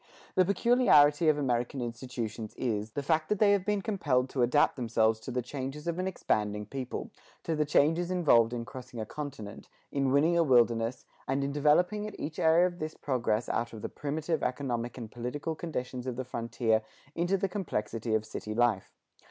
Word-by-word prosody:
The 185 Hz, -, +4 dB
peculiarity 175 Hz, -, +4 dB
of 150 Hz, -, +3 dB
American 125 Hz, -1 st, -1 dB
institutions 120 Hz, -2 st, -5 dB
is, 110 Hz, -3 st, -2 dB
the 145 Hz, -, -3 dB
fact 155 Hz, +2 st, +1 dB
that 210 Hz, -, +1 dB
they 205 Hz, 0 st, +5 dB
have 200 Hz, -2 st, +2 dB
been 205 Hz, 0 st, -1 dB
compelled 145 Hz, -, 0 dB
to 130 Hz, -, -1 dB
adapt 125 Hz, +5 st, +3 dB
themselves 115 Hz, -3 st, +1 dB
to 110 Hz, -, -9 dB
the 125 Hz, 0 st, -2 dB
changes 135 Hz, +4 st, -6 dB
of 170 Hz, +1 st, -2 dB
an 185 Hz, -, -1 dB
expanding 105 Hz, -, -1 dB
people 130 Hz, +3 st, -5 dB, 0.3 s
to 165 Hz, -, -1 dB
the 150 Hz, 0 st, +1 dB
changes 160 Hz, +4 st, +2 dB
involved 145 Hz, -11 st, +4 dB
in 120 Hz, -1 st, -4 dB
crossing 125 Hz, +1 st, -9 dB
a 110 Hz, -, -3 dB
continent, 110 Hz, -6 st, -7 dB, 0.2 s
in 135 Hz, -2 st, +1 dB
winning 155 Hz, +5 st, +4 dB
a 170 Hz, -, +4 dB
wilderness, 120 Hz, -3 st, +2 dB, 0.2 s
and 135 Hz, +1 st, 0 dB
in 140 Hz, -, -1 dB
developing 175 Hz, +9 st, +2 dB
at 210 Hz, -, -9 dB
each 155 Hz, +2 st, -5 dB
area 165 Hz, +2 st, +5 dB
of 175 Hz, -1 st, -3 dB
this 155 Hz, 0 st, -4 dB
progress 120 Hz, -4 st, -1 dB
out 115 Hz, 0 st, -2 dB
of 110 Hz, -, -9 dB
the -, -, -3 dB
primitive 155 Hz, +2 st, -2 dB
economic 125 Hz, -3 st, -2 dB
and 115 Hz, -3 st, -7 dB
political 125 Hz, +7 st, -4 dB
conditions 130 Hz, -6 st, -5 dB
of 125 Hz, -, -2 dB
the 130 Hz, +1 st, -4 dB
frontier 115 Hz, -2 st, 0 dB, 0.3 s
into 175 Hz, +4 st, +1 dB
the 195 Hz, +1 st, 0 dB
complexity 115 Hz, -, -2 dB
of 110 Hz, 0 st, 0 dB
city 110 Hz, 0 st, -6 dB
life. 115 Hz, -5 st, +1 dB
135 Hz, 190 wpm, -30 LUFS, 120-160 Hz, 0.3 s, they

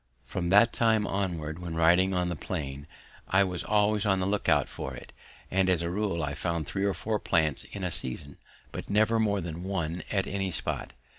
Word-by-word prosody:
From 85 Hz, +6 st, -3 dB
that 105 Hz, +5 st, +6 dB
time 110 Hz, -2 st, +3 dB
onwards, 85 Hz, -6 st, -2 dB
when 85 Hz, -2 st, -5 dB
riding 90 Hz, +3 st, +4 dB
on 90 Hz, -1 st, 0 dB
the 85 Hz, -, -2 dB
plain, 70 Hz, -3 st, -5 dB, 0.4 s
I 95 Hz, +1 st, +4 dB
was 90 Hz, -2 st, -2 dB
always 105 Hz, 0 st, +2 dB
on 95 Hz, -3 st, +2 dB
the 95 Hz, -, 0 dB
look 100 Hz, +1 st, 0 dB
out -, -, +4 dB
for 65 Hz, -1 st, -6 dB
it, -, -, -11 dB, 0.4 s
and 95 Hz, 0 st, +3 dB
as 90 Hz, -2 st, +2 dB
a 85 Hz, -, -1 dB
rule 95 Hz, -4 st, -1 dB
I 70 Hz, -1 st, -2 dB
found 85 Hz, 0 st, -2 dB
three 95 Hz, +6 st, -2 dB
or 100 Hz, -, +1 dB
four 110 Hz, -1 st, -1 dB
plants 80 Hz, -6 st, +1 dB
in 100 Hz, -, -7 dB
a 90 Hz, -, -1 dB
season, 70 Hz, 0 st, -5 dB, 0.3 s
but -, -, -7 dB
never 110 Hz, +2 st, +3 dB
more 100 Hz, -3 st, +1 dB
than 85 Hz, 0 st, -5 dB
one 90 Hz, -3 st, -2 dB
at 95 Hz, -2 st, +1 dB
any 95 Hz, -1 st, -2 dB
spot. 90 Hz, -, -3 dB
95 Hz, 210 wpm, -28 LUFS, 80-100 Hz, 0.4 s, that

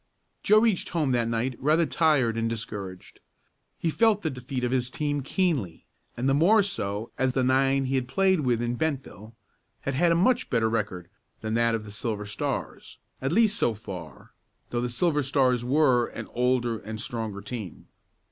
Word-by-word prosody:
Joe 215 Hz, +1 st, +5 dB
reached 220 Hz, -5 st, +1 dB
home 155 Hz, -6 st, 0 dB
that 120 Hz, -2 st, +1 dB
night 115 Hz, +2 st, -1 dB
rather 155 Hz, +4 st, +3 dB
tired 145 Hz, -9 st, +2 dB
and 115 Hz, 0 st, 0 dB
discouraged. 100 Hz, -5 st, -7 dB, 0.6 s
He 165 Hz, -, -1 dB
felt 220 Hz, +2 st, +3 dB
the 160 Hz, -, 0 dB
defeat 125 Hz, 0 st, -5 dB
of 125 Hz, -, 0 dB
his 125 Hz, -1 st, 0 dB
team 145 Hz, +1 st, -2 dB
keenly, 140 Hz, -, -1 dB, 0.3 s
and 125 Hz, +3 st, -1 dB
the 135 Hz, -, +3 dB
more 195 Hz, +9 st, +5 dB
so 105 Hz, -, -3 dB
as 130 Hz, -1 st, +2 dB
the 130 Hz, -, +1 dB
nine 135 Hz, +1 st, +2 dB
he 130 Hz, -, -2 dB
had 130 Hz, -2 st, 0 dB
played 190 Hz, +4 st, +2 dB
with 120 Hz, -5 st, +1 dB
in 120 Hz, +1 st, -2 dB
Bentville 130 Hz, -8 st, -4 dB, 0.5 s
had 135 Hz, -, -2 dB
had 170 Hz, +6 st, +3 dB
a -, -, +4 dB
much 245 Hz, +8 st, +2 dB
better 115 Hz, -2 st, +1 dB
record 100 Hz, -6 st, -2 dB, 0.3 s
than 110 Hz, 0 st, -3 dB
that 115 Hz, 0 st, +2 dB
of 110 Hz, -1 st, -5 dB
the 105 Hz, -, -9 dB
Silver 105 Hz, 0 st, -3 dB
Stars 105 Hz, -, -4 dB, 0.2 s
at 135 Hz, +2 st, -1 dB
least 215 Hz, +2 st, +3 dB
so 115 Hz, -, +1 dB
far, 90 Hz, -8 st, -9 dB, 0.4 s
though 120 Hz, -, -1 dB
the 125 Hz, -, -1 dB
Silver 150 Hz, +5 st, +1 dB
Stars 130 Hz, -3 st, +2 dB
were 130 Hz, -2 st, +3 dB
an -, -, -7 dB
older 120 Hz, -2 st, +1 dB
and 110 Hz, +2 st, -7 dB
stronger 110 Hz, -3 st, -4 dB
team. 105 Hz, -3 st, -7 dB
125 Hz, 185 wpm, -26 LUFS, 115-150 Hz, 0.6 s, Joe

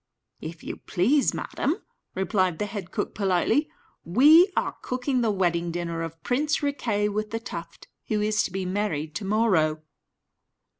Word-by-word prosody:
"If 160 Hz, +1 st, -8 dB
you -, -, -5 dB
please, 260 Hz, +11 st, +2 dB
madam," 310 Hz, -, -1 dB, 0.4 s
replied 185 Hz, -2 st, +1 dB
the 210 Hz, -, -1 dB
head 200 Hz, -3 st, -6 dB
cook, 205 Hz, -, -3 dB
politely, 205 Hz, -, +1 dB, 0.3 s
"we 300 Hz, -, +6 dB
are -, -, 0 dB
cooking 255 Hz, 0 st, -1 dB
the 230 Hz, -, +2 dB
wedding 175 Hz, -4 st, +1 dB
dinner 170 Hz, -1 st, -3 dB
of 165 Hz, 0 st, -7 dB
Prince 290 Hz, +4 st, 0 dB
Riquet 230 Hz, -8 st, 0 dB
with 215 Hz, +1 st, -2 dB
the 225 Hz, -, -3 dB
Tuft, 230 Hz, -, -8 dB, 0.2 s
who 215 Hz, -, 0 dB
is 215 Hz, 0 st, +2 dB
to -, -, -4 dB
be 190 Hz, 0 st, -3 dB
married 180 Hz, -6 st, -2 dB
to 195 Hz, +5 st, -4 dB
morrow." 185 Hz, -8 st, +2 dB
205 Hz, 155 wpm, -26 LUFS, 175-235 Hz, 0.4 s, we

